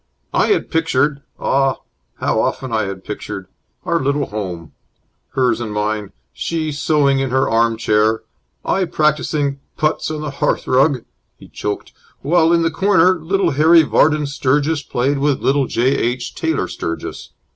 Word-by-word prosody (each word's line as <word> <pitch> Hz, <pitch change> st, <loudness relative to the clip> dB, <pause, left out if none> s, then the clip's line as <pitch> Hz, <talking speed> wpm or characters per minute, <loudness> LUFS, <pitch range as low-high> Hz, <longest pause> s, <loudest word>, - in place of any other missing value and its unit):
"I -, -, +3 dB
had 415 Hz, -, 0 dB
pictured 150 Hz, -3 st, +1 dB, 0.2 s
ah, 135 Hz, 0 st, +2 dB, 0.4 s
how -, -, 0 dB
often 130 Hz, -3 st, -2 dB
I 110 Hz, -1 st, +1 dB
had 95 Hz, -1 st, -6 dB
pictured! 95 Hz, -, -6 dB, 0.4 s
our 170 Hz, -2 st, +1 dB
little 140 Hz, 0 st, 0 dB
home! 90 Hz, -6 st, -6 dB, 0.6 s
Hers 125 Hz, -2 st, +1 dB
and 110 Hz, -2 st, -4 dB
mine. 105 Hz, -1 st, -2 dB, 0.2 s
She 160 Hz, -, -2 dB
sewing 145 Hz, -2 st, +2 dB
in 135 Hz, -1 st, -1 dB
her 130 Hz, +1 st, +2 dB
arm 115 Hz, 0 st, +2 dB
chair, 110 Hz, 0 st, +2 dB, 0.4 s
I 190 Hz, -, +1 dB
practising 150 Hz, -3 st, 0 dB, 0.2 s
putts 155 Hz, +1 st, 0 dB
on 155 Hz, -1 st, -4 dB
the 150 Hz, -2 st, -4 dB
hearth 140 Hz, -, -1 dB
rug 130 Hz, -1 st, +2 dB
" -, -, -49 dB
He -, -, -15 dB
choked. 105 Hz, 0 st, -5 dB, 0.3 s
"While 165 Hz, +2 st, +3 dB
in 170 Hz, -1 st, +3 dB
the 165 Hz, -, +1 dB
corner, 190 Hz, -2 st, +4 dB
little 180 Hz, +2 st, 0 dB
Harry 160 Hz, +4 st, +6 dB
Vardon 150 Hz, 0 st, +3 dB
Sturgis 145 Hz, +2 st, 0 dB
played 135 Hz, +1 st, -1 dB
with 145 Hz, -1 st, +1 dB
little 135 Hz, -1 st, +2 dB
J. 125 Hz, +2 st, +1 dB
H. 120 Hz, +1 st, -2 dB
Taylor 160 Hz, -, -1 dB
Sturgis. 85 Hz, -, -6 dB
140 Hz, 155 wpm, -18 LUFS, 120-155 Hz, 0.6 s, Harry